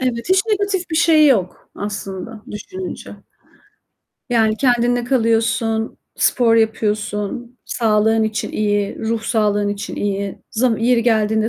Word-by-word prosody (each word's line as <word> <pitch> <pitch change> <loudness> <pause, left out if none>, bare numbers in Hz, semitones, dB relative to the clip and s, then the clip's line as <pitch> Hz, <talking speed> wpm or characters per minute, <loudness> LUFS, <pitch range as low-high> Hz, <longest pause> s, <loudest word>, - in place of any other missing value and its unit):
Evet, 250 +2 -2
hiç 375 +1 +4
negatif 400 -4 -1
bir 315 - -1
şey 315 -2 +5
yok 195 -10 0
aslında 205 +1 -6
düşününce. 370 - -7 1.2
Yani, 220 -2 +2
kendinle 245 -2 +2
kalıyorsun, 225 -2 0 0.2
spor 230 -2 +3
yapıyorsun, 220 +2 -1
sağlığın 220 -1 +2
için 220 0 -3
iyi, 205 -1 -1
ruh 225 0 -2
sağlığın 210 -3 +1
için 205 0 -5
iyi, 200 -1 -2
z 225 - -3 0.2
yeri 235 +1 +2
geldiğinde 220 -1 +2
225 Hz, 120 wpm, -19 LUFS, 210-245 Hz, 1.2 s, şey